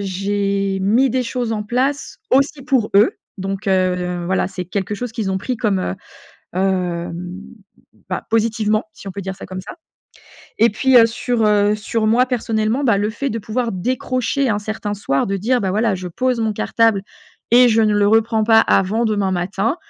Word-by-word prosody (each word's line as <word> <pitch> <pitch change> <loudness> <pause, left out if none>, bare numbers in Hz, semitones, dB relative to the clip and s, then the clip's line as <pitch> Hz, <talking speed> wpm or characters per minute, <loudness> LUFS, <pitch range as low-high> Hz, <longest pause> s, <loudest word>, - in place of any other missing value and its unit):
j'ai 195 0 -1
mis 230 +8 +3
des 255 +2 0
choses 240 -1 -3
en 215 -1 -2
place 265 +6 -2
aussi 275 +1 +2
pour 255 -5 +1
eux. 205 +3 +5 0.3
Donc, 195 +2 -4
heu, 180 -2 0
voilà 190 +1 0
c'est 185 -1 -6
quelque 195 +3 -3
chose 245 +1 -5
qu'ils 220 -4 -2
ont 190 - 0
pris 245 +6 -3
comme, 205 -4 +1
heu, 185 - -2 0.6
hem, 180 -1 -2 0.7
bah, - - -3
positivement 220 -1 +1
si - - -12
on - - -4
peut 200 +2 -6
dire 190 0 -5
ça 195 - -9
comme 185 0 -7
ça. 195 - -9 0.9
Et 230 - +5
puis, 260 +5 +3
heu, 230 - +7
sur, 230 0 -1
heu, 210 0 +3
sur 215 +1 -2
moi 240 +4 +3
personnellement, 230 +1 -1
bah, 230 -6 +3
le 205 +1 0
fait 275 +5 -3
de 230 - -3
pouvoir 230 +3 -2
décrocher 255 +6 -1
un 205 - 0
certain 215 0 -4
soir 140 -9 -1
de 195 - -1
dire, 245 +6 +1
bah, 190 - 0
voilà 215 +1 +1
je 185 0 -7
pose 250 +7 -1
mon 220 -1 0
cartable 225 -1 +1 0.5
et 245 +1 +7
je 225 -1 +3
ne 215 -1 +3
le 205 0 +3
reprends 220 0 +2
pas 225 0 +6
avant 210 +3 +2
demain 205 -3 0
matin, 195 - -1
210 Hz, 195 wpm, -19 LUFS, 195-230 Hz, 0.9 s, heu